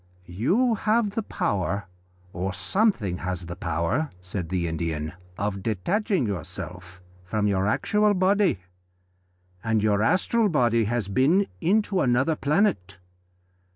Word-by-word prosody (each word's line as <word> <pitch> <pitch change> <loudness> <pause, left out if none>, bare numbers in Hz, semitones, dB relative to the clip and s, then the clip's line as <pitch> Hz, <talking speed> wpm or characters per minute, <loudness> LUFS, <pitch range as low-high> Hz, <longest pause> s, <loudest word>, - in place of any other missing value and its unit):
"You 180 - +1
have 215 0 +1
the 225 - -2
power, 100 - -2 0.5
or 95 +2 -3
something 105 - 0
has 90 -1 -4
the 85 0 -6
power," 85 - -1
said 90 -2 -5
the 90 -2 -1
Indian, 80 -1 -3 0.2
"of 100 -1 -2
detaching 160 - 0
you 100 -5 -2 0.8
from 105 +3 -1
your 100 -1 +1
actual 210 - +2
body, 190 - +3 1.1
and 110 -2 +1
your 105 -1 +2
astral 200 - +2
body 120 - +2
has 115 -2 -1
been 140 - +3 0.2
into 195 +2 +2
another 130 +5 +2
planet. 140 - 0
110 Hz, 120 wpm, -25 LUFS, -, 1.1 s, body